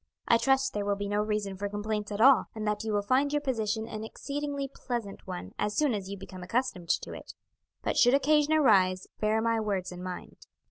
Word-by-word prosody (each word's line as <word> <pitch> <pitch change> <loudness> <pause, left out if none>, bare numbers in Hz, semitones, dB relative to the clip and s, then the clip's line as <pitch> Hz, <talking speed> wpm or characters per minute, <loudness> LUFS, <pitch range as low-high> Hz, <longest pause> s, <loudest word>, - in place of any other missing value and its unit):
I 230 - +5
trust 270 +1 +2
there 205 - -1
will 200 0 0
be 200 0 -4
no 205 +1 +1
reason 210 -2 -2
for 200 +2 -3
complaints 210 +1 -3
at 205 - -3
all, 260 +1 +7
and 215 -1 -4
that 210 0 -1
you 220 - -2
will 205 -1 +1
find 265 +7 +2
your 295 - +2
position 225 -5 -1
an 215 -1 -6
exceedingly 280 +4 -4
pleasant 240 -6 -5
one 90 +1 -6
as 210 0 -1
soon 295 -5 +3
as 195 -2 -4
you 200 - -5
become 185 -1 -10
accustomed 185 -3 -2
to - - 0
it; - - -10 0.5
but - - -1
should 245 +2 +6
occasion 300 +2 +3
arise 190 -10 +4
bear 220 +1 +1
my 230 -1 +2
words 195 -4 -2
in 180 0 -8
mind." 180 -1 -7
215 Hz, 220 wpm, -29 LUFS, 200-260 Hz, 0.5 s, all